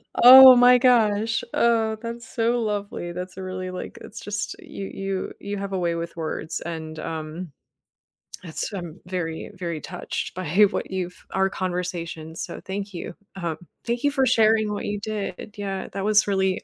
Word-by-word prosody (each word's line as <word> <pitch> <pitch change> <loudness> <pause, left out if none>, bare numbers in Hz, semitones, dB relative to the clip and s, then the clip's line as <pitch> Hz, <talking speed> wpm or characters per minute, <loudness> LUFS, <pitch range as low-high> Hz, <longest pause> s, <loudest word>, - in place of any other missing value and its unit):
Oh 260 +1 +11
my 245 0 +7
gosh. 225 -3 +3
Oh, 225 -2 +2
that's 235 0 -6
so 235 +1 0
lovely, 205 -5 -3
that's 180 +1 -7
a 190 - -5
really 185 0 -5
like 180 - -7
it's - - -9
just 205 0 -4
you 195 - -8
you 195 -1 -4
you 200 0 -4
have 195 0 -4
a 185 - 0
way 170 -1 0
with 170 0 -5
words 160 0 -3
and, 160 -2 -6
um 160 +1 -5 0.9
That's 165 +5 -4
I'm 175 -2 -6
very, 170 -3 -4
very 170 -4 -4
touched 180 - -5
by 185 -3 -4 0.2
what - - -4
you've 180 -1 -5
our 190 0 +2
conversation, 175 -4 -4
so - - -6
thank 200 +1 -5
you. 175 0 -6 0.2
Um, 170 -4 -3 0.3
thank 235 +2 -2
you 285 - +3
for 270 -2 +2
sharing 220 -3 +4
what - - -4
you 205 0 -2
did. 210 -1 -5
Yeah, 195 -2 -4
that 195 0 -3
was 215 0 +4
really, 190 -1 +1
195 Hz, 175 wpm, -24 LUFS, 175-220 Hz, 0.9 s, Oh